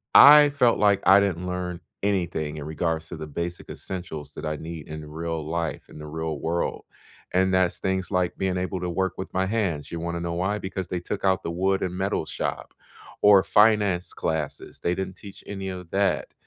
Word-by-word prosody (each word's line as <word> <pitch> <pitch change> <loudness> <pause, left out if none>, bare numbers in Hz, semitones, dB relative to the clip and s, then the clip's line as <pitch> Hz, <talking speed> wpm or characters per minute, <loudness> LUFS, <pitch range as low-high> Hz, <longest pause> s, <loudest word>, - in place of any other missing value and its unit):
I 145 +1 +10
felt 125 -7 +3
like 100 -1 +4
I 95 +2 +8
didn't 90 -3 0
learn 90 -1 -3 0.2
anything 85 -6 -1
in 75 - -6
regards 80 0 -2
to - - -6
the 80 -1 -6
basic 85 +4 -5
essentials 80 -6 -6
that - - -7
I 75 0 -1
need 80 -1 -8
in 75 0 -7
real 80 0 -4
life, 85 0 -3
in 75 - -12
the 75 - -8
real 80 -1 -4
world, 85 +1 -2 0.5
and 95 0 +3
that's 95 -1 +2
things 95 0 -1
like 90 -2 0
being 95 -1 0
able 90 0 -2
to 90 - -2
work 95 +1 0
with 95 - -6
my 95 +1 +1
hands, 95 -8 -1
you 85 - -4
wanna 85 0 -3
know 85 0 -2
why? 95 +4 0
Because 95 -1 -4
they 90 - -2
took 85 - -5
out 95 0 +2
the 85 - -3
wood 95 +2 +1
and 90 0 -2
metal 95 -4 -1
shop - - -4 0.5
or 100 -2 +7
finance 105 -4 +3
classes, 80 -2 -3
they 85 - +1
didn't 95 -1 -4
teach 100 -1 -12
any 95 -1 -5
of 90 -2 -7
that. 100 0 0
90 Hz, 205 wpm, -25 LUFS, 80-95 Hz, 0.5 s, I